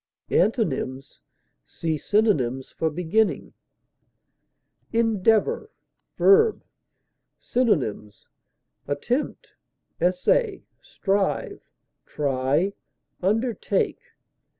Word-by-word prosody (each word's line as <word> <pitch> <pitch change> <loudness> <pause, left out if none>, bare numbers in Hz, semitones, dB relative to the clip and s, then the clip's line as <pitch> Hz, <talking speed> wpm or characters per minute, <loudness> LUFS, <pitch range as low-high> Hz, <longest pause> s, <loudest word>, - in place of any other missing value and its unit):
Antonyms: 135 - 0 0.4
See 160 -1 -3
synonyms 145 - +1
for 160 - -1
BEGINNING. 180 +7 0 1.4
ENDEAVOR, 225 - +2 0.5
v. 445 +3 +6 0.9
Synonyms: 130 - -1 0.6
attempt, 225 - -2 0.5
essay, 185 - +1 0.2
strive, 195 0 -2 0.4
try, 145 +6 0 0.5
undertake. 225 - 0
195 Hz, 55 wpm, -24 LUFS, 145-225 Hz, 1.4 s, v